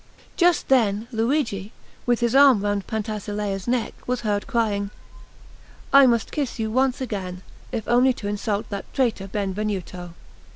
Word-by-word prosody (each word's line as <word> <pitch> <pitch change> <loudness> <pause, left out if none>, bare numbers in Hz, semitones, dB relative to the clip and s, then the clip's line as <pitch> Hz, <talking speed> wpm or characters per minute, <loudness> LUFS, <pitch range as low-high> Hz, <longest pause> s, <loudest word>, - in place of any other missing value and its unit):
Just 350 -2 +3
then 225 -4 +2
Luigi, 225 -4 -1 0.4
with 245 0 +2
his 235 -1 +1
arm 270 -6 +6
round 205 -1 -1
Pantasilea's 210 -2 -3
neck, 240 -1 0
was 250 -1 -1
heard 205 -2 -1
crying: 215 -6 0 1.0
"I 275 -1 +8
must 235 -2 +1
kiss 285 -5 -2
you 220 -1 -2
once 260 +2 +1
again, 185 -7 -4 0.3
if 225 -4 -4
only 245 +2 +4
to 210 - -6
insult 205 0 -2
that 200 -1 -6
traitor 235 -7 0
Benvenuto." 190 -3 -4
220 Hz, 140 wpm, -23 LUFS, 200-250 Hz, 1.0 s, I